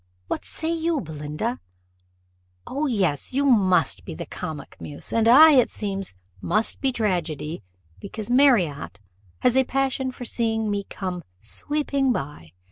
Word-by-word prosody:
What - - -4
say 320 +1 -2
you, 330 -1 0
Belinda? 155 - -4 1.1
O 290 +3 -2
yes, 195 - 0
you 280 +2 +1
must 200 -9 +3
be 165 - -7
the - - -6
comic 150 -3 -7
muse; 145 - -6
and 225 0 +3
I, 305 +7 +9
it 255 -4 +5
seems, 195 - -4 0.3
must 215 +5 0
be 270 - +2
tragedy, 175 - -2 0.4
because 215 - -7
Marriott 235 - +3 0.4
has 250 -1 +3
a 265 - +5
passion 265 0 -1
for 250 -1 -8
seeing 225 -2 -1
me 200 -1 -2
'come 185 -2 -5 0.2
sweeping 280 - -1
by. 135 - -5
220 Hz, 140 wpm, -24 LUFS, 170-265 Hz, 1.1 s, I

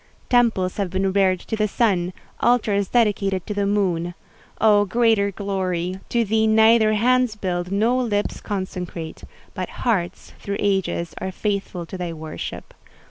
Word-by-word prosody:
Temples 225 -7 +2
have 200 -3 -1
been 190 +1 0
reared 190 -2 +3
to - - -4
the 215 -1 +1
Sun—altars 200 +1 0
dedicated 200 -5 +1
to 210 - -3
the 200 -1 0
Moon. 175 -4 0 0.4
Oh, 210 -2 +5
greater 220 -1 +2
glory! 185 -2 -2
To 235 -1 +1
thee 220 +1 +2
neither 220 0 +5
hands 250 +1 +2
build, 180 -3 -3
nor 230 +6 +2
lips 210 -4 -1
consecrate: 180 -4 -5 0.3
but - - -4 0.2
hearts, 195 -8 -1
through 200 0 -4
ages, 190 -4 -1
are 190 - -3
faithful 195 -3 -3
to 185 +2 -8
thy 175 -2 -3
worship. 155 -1 -7
200 Hz, 140 wpm, -22 LUFS, 185-220 Hz, 0.4 s, Oh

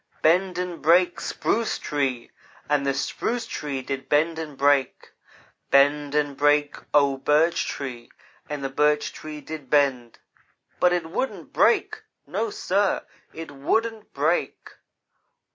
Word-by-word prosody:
'Bend 180 +3 +3
and 180 -2 -4
break, 175 +3 +4
Spruce 230 -1 -1
Tree!' 135 -5 -2 0.4
and 145 -1 +1
the 135 - +2
Spruce 230 - -2
Tree 140 -10 -4
did 135 0 -5
bend 160 +2 +2
and 150 -4 -7
break. 140 -1 +1 0.6
'Bend 145 +1 +3
and 145 -2 +1
break, 145 +1 +2 0.2
O 140 -2 +3
Birch 150 +5 +2
Tree!' 125 -4 -6 0.4
and 145 -2 -4
the 135 - -2
Birch 150 +2 +1
Tree 155 -1 -8
did 150 -2 -8
bend, 135 -5 +1 0.6
but 180 - +4
it 175 -2 0
wouldn't 265 - -4
break 430 0 +2 0.2
no, 445 - -2
sir! 205 - 0 0.3
it 165 -2 -8
wouldn't 220 +11 -1
break! 155 +5 -1
150 Hz, 130 wpm, -24 LUFS, 140-175 Hz, 0.6 s, break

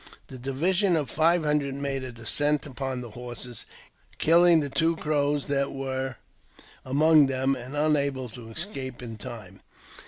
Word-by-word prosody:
The 130 - -9
division 175 - +1
of 150 -5 -1
five 165 +1 +3
hundred 150 -2 0
made 140 -1 -3
a 130 - -5
descent 145 +5 0
upon 130 -2 -4
the 120 -2 -8
ho: 120 +2 -7 0.8
killing 170 +1 +5
the 145 -2 -2
two 165 +2 +2
Crows 145 -2 0
that 140 -1 0
were 135 -1 -3 0.7
among 150 +2 +5
them, 135 +1 +1
and 130 +2 -8
unable 140 -3 +1
to 115 0 -11
escape 130 - -4
in 115 -2 -7
time. 100 -3 -9
140 Hz, 150 wpm, -27 LUFS, 130-150 Hz, 0.8 s, killing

